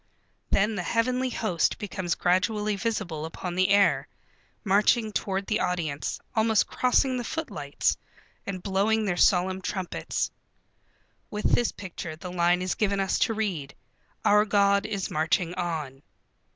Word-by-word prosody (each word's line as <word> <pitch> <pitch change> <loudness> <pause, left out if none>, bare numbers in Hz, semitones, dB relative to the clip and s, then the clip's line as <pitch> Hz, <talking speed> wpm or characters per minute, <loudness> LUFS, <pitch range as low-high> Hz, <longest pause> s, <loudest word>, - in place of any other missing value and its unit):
Then 210 +3 +2
the 200 - -2
heavenly 250 +7 0
host 200 -8 0
becomes 185 -5 -3
gradually 210 +4 +1
visible 195 -7 -2
upon 175 +2 -5
the 185 +2 +2
air, 200 0 +4 0.6
marching 210 +3 +3
toward 195 -1 -2
the 215 - 0
audience, 160 -5 -2 0.2
almost 220 -1 +3
crossing 255 +1 +2
the 245 - -3
footlights, 320 +7 -2 0.5
and 185 -2 -4
blowing 210 +3 +1
their 185 -3 0
solemn 185 +1 +3
trumpets. 185 -1 -3 1.0
With 210 0 -1
this 240 - +3
picture 175 -4 -7
the 180 +3 -8
line 175 0 +2
is 185 - 0
given 200 -2 0
us 195 -1 +1
to 225 - +1
read: 180 -11 -3 0.5
"Our 210 0 +6
God 200 -1 +3
is 195 -2 -3
marching 160 +3 +1
on." 155 -7 -4
195 Hz, 140 wpm, -27 LUFS, 180-215 Hz, 1.0 s, Our